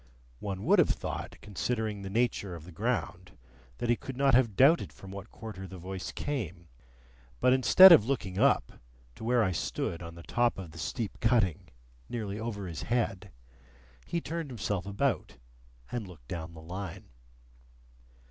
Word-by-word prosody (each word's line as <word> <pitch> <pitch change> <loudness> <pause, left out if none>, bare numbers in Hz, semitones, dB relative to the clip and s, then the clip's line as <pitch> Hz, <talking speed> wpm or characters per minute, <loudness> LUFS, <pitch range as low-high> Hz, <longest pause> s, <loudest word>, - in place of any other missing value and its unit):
One 100 -1 -4
would - - +5
have - - +5
thought, - - -4
considering 105 0 -2
the 95 - -6
nature 105 -4 0
of 80 - -10
the 90 - -11
ground, 95 -3 -3 0.4
that - - -2
he 120 - +4
could 130 +2 -8
not 135 -1 +3
have 120 -5 +4
doubted 145 - +5
from 95 - -12
what 100 +2 -8
quarter 100 -4 -8
the 95 - -9
voice 95 +1 -6
came; 95 - -4 0.7
but 125 - +5
instead 155 +9 +9
of 165 - +9
looking 105 -7 -2
up - - +3 0.4
to - - -11
where 120 0 +3
I 95 - +1
stood 85 0 -2
on 85 -1 -8
the 85 - -11
top 120 +4 +1
of 90 -4 -7
the 80 - -11
steep 115 +3 -4
cutting 115 -9 +2 0.4
nearly 105 -3 -4
over 110 -3 -4
his 85 -4 -5
head, 110 -5 -1 0.8
he 170 - -1
turned 165 -2 -4
himself 100 -6 -3
about, 100 0 -1 0.5
and 120 -5 -3
looked 75 -10 -14
down 85 +2 -6
the 80 - -11
Line. 90 +1 -7
100 Hz, 165 wpm, -30 LUFS, 90-120 Hz, 0.8 s, instead